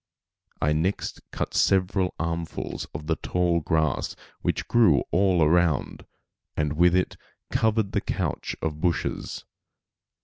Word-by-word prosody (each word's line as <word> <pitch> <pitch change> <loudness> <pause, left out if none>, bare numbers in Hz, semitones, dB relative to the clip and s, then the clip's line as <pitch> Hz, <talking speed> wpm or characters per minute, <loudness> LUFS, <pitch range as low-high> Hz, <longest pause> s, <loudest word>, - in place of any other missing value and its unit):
I 75 +1 +2
next 85 +6 -1
cut - - -4
several 95 -1 +2
armfuls 85 0 -3
of 75 +1 -7
the 80 +1 0
tall 90 -1 +1
grass 80 -2 0 0.3
which - - -1
grew 110 -12 +4
all 90 -2 +3
around 80 -2 +1 0.5
and 75 -1 0
with 85 +3 +4
it 90 - 0 0.3
covered 110 -2 +1
the - - 0
couch - - -2
of 75 -1 -2
bushes. 85 -2 -2
85 Hz, 125 wpm, -26 LUFS, 80-90 Hz, 0.5 s, grew